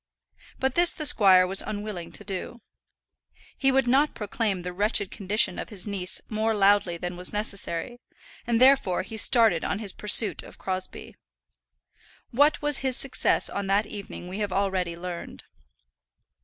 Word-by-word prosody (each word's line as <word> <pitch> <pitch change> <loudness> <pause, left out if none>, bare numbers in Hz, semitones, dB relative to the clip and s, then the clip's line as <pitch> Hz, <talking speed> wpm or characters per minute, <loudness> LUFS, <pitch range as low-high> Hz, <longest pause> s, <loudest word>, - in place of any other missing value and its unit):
But 265 -1 0
this 345 +2 +3
the 305 - -5
squire 190 -8 +7
was 190 +1 -2
unwilling 205 -5 -6
to - - -5
do. 200 +4 -7 0.9
He 270 -1 +2
would 265 -1 +1
not 275 +5 +2
proclaim 205 -3 -3
the 180 0 -6
wretched 205 +1 -1
condition 200 -1 0
of - - -6
his 200 -4 -5
niece 190 -3 -4
more 220 0 -1
loudly 200 -3 +2
than 175 +1 -5
was 180 0 +1
necessary, 210 +1 -3 0.5
and 235 -1 +1
therefore 260 -9 +3
he 220 - -9
started 220 -5 +3
on - - -2
his 210 -2 -4
pursuit 210 +1 +4
of - - -15
Crosbie. 185 -1 -6 1.1
What 290 +5 +2
was 295 -2 0
his 265 -1 -2
success 275 - 0
on 200 -1 -4
that 200 +2 +1
evening 200 -3 -9
we 190 +3 -6
have 205 -2 -3
already 190 -3 -1
learned. 175 -1 -8
205 Hz, 155 wpm, -25 LUFS, 185-230 Hz, 1.1 s, squire